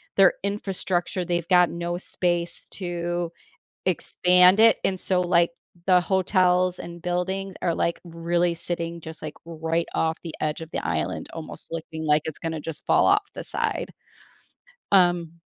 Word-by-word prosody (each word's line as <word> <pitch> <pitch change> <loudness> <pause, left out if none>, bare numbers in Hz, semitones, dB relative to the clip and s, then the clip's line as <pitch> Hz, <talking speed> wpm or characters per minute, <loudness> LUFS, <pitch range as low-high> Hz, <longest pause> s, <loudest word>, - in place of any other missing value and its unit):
their 195 -2 +6
infrastructure, 190 -3 -2
they've 175 -1 -1
got 180 -1 +6
no 170 +1 -3
space 175 -1 -2
to 175 -2 -3 0.6
expand 180 +2 +4
it, 225 0 +7
and 190 - +1
so, 185 -1 +1
like, 175 -1 +3 0.4
the 180 -1 +6
hotels 185 -1 +2
and 170 0 -8
buildings 190 +2 -2
are, 170 -2 +1
like, 170 - -1
really 170 +1 0
sitting 170 0 -4
just, 160 0 -10
like, 155 -1 -5
right 165 0 -2
off 160 0 +1
the 165 -2 -7
edge 155 +1 -1
of 160 0 -8
the - - -3
island, 80 -1 -2
almost 165 -1 -8
looking 160 -1 -5
like 150 0 +3
it's 160 - -5
gonna 160 -1 -3
just 155 0 -8
fall - - +4
off 405 +1 +4
the - - -5
side. - - -2 1.0
Um 175 -3 +3
175 Hz, 155 wpm, -25 LUFS, 165-180 Hz, 1.0 s, it